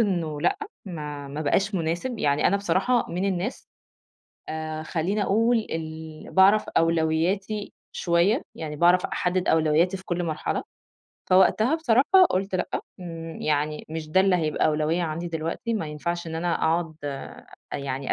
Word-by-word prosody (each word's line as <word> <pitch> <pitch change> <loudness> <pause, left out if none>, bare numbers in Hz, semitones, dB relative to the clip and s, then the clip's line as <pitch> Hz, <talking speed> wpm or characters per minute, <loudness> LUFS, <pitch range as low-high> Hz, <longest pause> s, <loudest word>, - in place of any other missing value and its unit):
إنه 170 -8 0
لأ، - - +1 0.3
ما 150 -6 -6
ما 145 +2 -5
بقاش 195 +7 +1
مناسب، 175 +8 -2
يعني 145 -3 +2
أنا 200 - +3
بصراحة 200 +4 +1
من 180 +3 -2
الناس 195 +5 -2 0.8
آآ 155 0 -4
خلّيني 180 +6 -1
أقول 230 +5 +3
ال 160 -1 -6
باعرف 195 +3 +5
أولوياتي 170 +6 0 0.2
شوية، 175 - +2
يعني 155 -2 -5
باعرف 175 +3 +4
أحدد 180 0 -1
أولوياتي 160 +4 +3
في 190 - -13
كل 175 0 -1
مرحلة. 155 -2 -2 0.7
فوقتها 215 - +5
بصراحة 320 +6 +5
قُلت 190 +1 -1
لأ 185 - -1 0.3
ن 165 -2 -7
يعني 150 0 -1
مش 160 -1 -5
ده 185 +5 +4
اللي 190 -1 +4
هيبقى 155 -3 +1
أولوية 155 +3 +1
عندي 165 +1 -3
دلوقتي، 165 +8 -3
ما 185 -7 -2
ينفعش 170 +3 -3
إن 160 - -5
أنا 170 +1 0
أقعد 165 0 0
أ 140 -1 -6 0.3
يعني 135 -1 -3
170 Hz, 150 wpm, -25 LUFS, 155-195 Hz, 0.8 s, باعرف